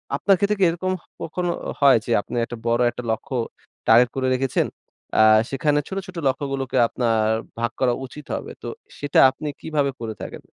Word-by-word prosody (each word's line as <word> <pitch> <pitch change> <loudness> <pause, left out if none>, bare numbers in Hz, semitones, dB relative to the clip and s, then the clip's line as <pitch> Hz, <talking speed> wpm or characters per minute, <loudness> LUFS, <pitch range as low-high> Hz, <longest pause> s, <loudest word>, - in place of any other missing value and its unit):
আপনার 195 -1 +3
ক্ষেত্রে 205 +2 +1
কি - - +3
এরকম 180 +3 -2
হ - - -29 0.2
কখনো 175 +2 -2 0.3
হয়? 140 -3 +7
যে 120 - -3
আপনি 120 - -8
একটা 120 - -7
বড় 120 +1 +2
একটা 125 - -7
লক্ষ্য 120 +4 -3 0.5
টার্গেট 120 +2 +6
করে 130 -1 0
রেখেছেন, 130 0 0 0.5
আ - - +4 0.3
সেখানে 145 +2 +1
ছোট, 195 - -5
ছোট 185 - -10
লক্ষ্যগুলোকে 135 -1 -2
আপনার 115 -3 +1 0.3
ভাগ 120 0 0
করা 125 -2 +3
উচিত 145 +3 -11
হবে। - - -6
তো, - - -7 0.3
সেটা 145 0 +2
আপনি 145 +3 -7
কিভাবে 145 -3 0
করে 115 -2 -4
থাকেন? - - -8
135 Hz, 180 wpm, -23 LUFS, 120-155 Hz, 0.5 s, হয়